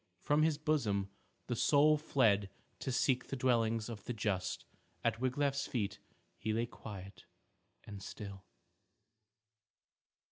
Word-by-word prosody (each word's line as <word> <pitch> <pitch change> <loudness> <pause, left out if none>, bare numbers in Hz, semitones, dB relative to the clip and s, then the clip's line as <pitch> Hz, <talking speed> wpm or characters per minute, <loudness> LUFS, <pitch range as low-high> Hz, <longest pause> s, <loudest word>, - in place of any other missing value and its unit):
From 145 +1 +2
his 155 -1 +3
bosom 115 -11 +1 0.3
the 120 - -1
soul 150 +5 +5
fled 110 -10 +3 0.3
to 130 - -2
seek 130 0 +2
the - - -3
dwellings 115 -3 +2
of 110 -4 -7
the 125 - -2
just. 100 -4 -1 0.4
At 115 0 +1
Wiglaf's 140 +2 +1
feet 105 -4 -2 0.4
he 110 0 -1
lay 115 +2 +1
quiet 100 -5 -9 0.6
and 100 -2 -8
still. 100 -2 -7
115 Hz, 120 wpm, -35 LUFS, 100-135 Hz, 0.6 s, soul